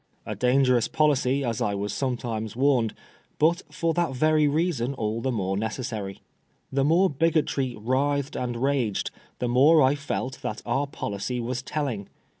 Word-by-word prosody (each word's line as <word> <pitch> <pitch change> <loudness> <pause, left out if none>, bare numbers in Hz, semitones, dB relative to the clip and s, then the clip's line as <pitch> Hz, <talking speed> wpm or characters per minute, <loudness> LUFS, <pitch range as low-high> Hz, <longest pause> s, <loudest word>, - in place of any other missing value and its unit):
A - - -3
dangerous 125 -1 +3
policy, 140 -3 +2
as 115 -3 -2
I 100 -1 0
was 100 0 -3
sometimes 115 -4 -3
warned; 125 -4 +2 0.4
but 170 +4 +3
for 165 +2 0
that 165 -5 0
very 155 +2 +3
reason 145 -4 0
all 110 -1 -2
the 130 - 0
more 95 -5 -1
necessary. 110 -2 -4 0.5
The 135 0 +1
more 170 +6 +4
Bigotry 150 -5 0
writhed 135 +5 0
and 120 -1 -2
raged, 135 -7 0 0.3
the 125 - -2
more 140 +6 +6
I 130 +1 +4
felt 140 -3 -4
that 105 - -4
our 135 +4 0
policy 120 -1 -4
was 125 +2 -3
telling. 130 -8 -3
130 Hz, 155 wpm, -26 LUFS, 115-145 Hz, 0.5 s, more